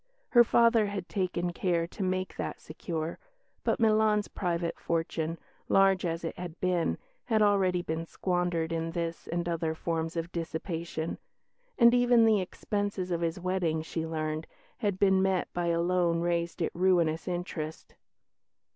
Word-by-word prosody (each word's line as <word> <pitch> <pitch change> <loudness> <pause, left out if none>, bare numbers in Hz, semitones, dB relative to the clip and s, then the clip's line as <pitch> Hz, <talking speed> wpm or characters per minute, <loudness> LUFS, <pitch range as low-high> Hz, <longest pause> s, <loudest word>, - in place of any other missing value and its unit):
Her 240 -1 +7
father 230 -2 +4
had 200 -3 -4
taken 180 -2 -1
care 170 -2 0
to 175 - -9
make 185 0 -1
that - - -4
secure, 160 +1 -5 0.4
but - - +1
Milan's 215 -2 +3
private 170 -3 -2
fortune, 165 0 -2 0.3
large 195 -2 +4
as 165 0 -3
it 165 - -3
had 175 -2 -7
been, 175 - +1 0.3
had 220 -3 +3
already 190 -3 +3
been 165 0 -3
squandered 175 -3 -1
in 165 0 -1
this 170 -1 -3
and 170 0 -2
other 165 -2 -1
forms 165 0 -2
of 165 +1 -3
dissipation; 165 -1 -4 0.6
and 235 -2 +7
even 245 -2 +5
the 215 -3 +4
expenses 200 0 -3
of 170 -1 0
his 170 +1 -1
wedding, 175 -3 0
she 160 0 -4
learned, 155 0 -3 0.3
had 205 -5 0
been 190 -1 +4
met 190 -1 0
by 175 -1 -1
a 170 0 +2
loan 170 -1 +2
raised 170 0 -1
at - - -2
ruinous 170 -3 +2
interest. 175 -3 -4
175 Hz, 155 wpm, -29 LUFS, 165-190 Hz, 0.6 s, Her